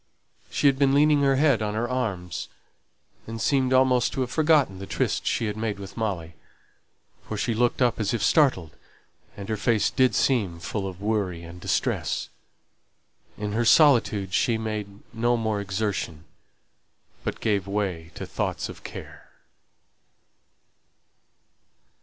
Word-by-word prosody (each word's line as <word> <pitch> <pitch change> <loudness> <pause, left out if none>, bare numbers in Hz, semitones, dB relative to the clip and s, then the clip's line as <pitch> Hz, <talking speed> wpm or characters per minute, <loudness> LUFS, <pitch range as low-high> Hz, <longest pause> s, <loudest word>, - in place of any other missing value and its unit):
She - - -2
had 135 -1 +4
been 140 -1 +4
leaning 150 0 +4
her 135 -1 +3
head 140 -4 +3
on 105 0 -2
her 115 +2 -1
arms, 100 - -3 0.8
and 115 0 -6
seemed 130 +2 +1
almost 130 -2 +3
to 135 - -2
have 125 -1 -2
forgotten 150 - +3
the 95 - -7
tryst - - -1
she - - 0
had 105 -1 -2
made 110 -1 -2
with 100 -1 -9
Molly, 95 -7 -3 0.9
for 110 - -4
she 115 +3 0
looked 120 +3 +1
up 120 -2 +1
as 105 -1 0
if 115 -4 -1
startled, 125 - +2 0.6
and 100 -1 -7
her 110 - -2
face 110 0 +1
did 130 -1 +3
seem 100 -11 +1
full 95 +3 -3
of 95 0 -8
worry 100 -6 -1
and 85 +1 -11
distress; - - -1 1.1
in 105 0 -3
her 115 +3 0
solitude 115 - +4
she 115 0 +2
made 105 -2 -5
no 120 +1 +1
more 110 -2 -1
exertion, 95 -5 -3 1.0
but - - -3
gave 100 -3 0
way 95 -5 -2
to - - -6
thoughts - - -3
of - - -11
care. - - -10
110 Hz, 145 wpm, -25 LUFS, 100-125 Hz, 1.1 s, had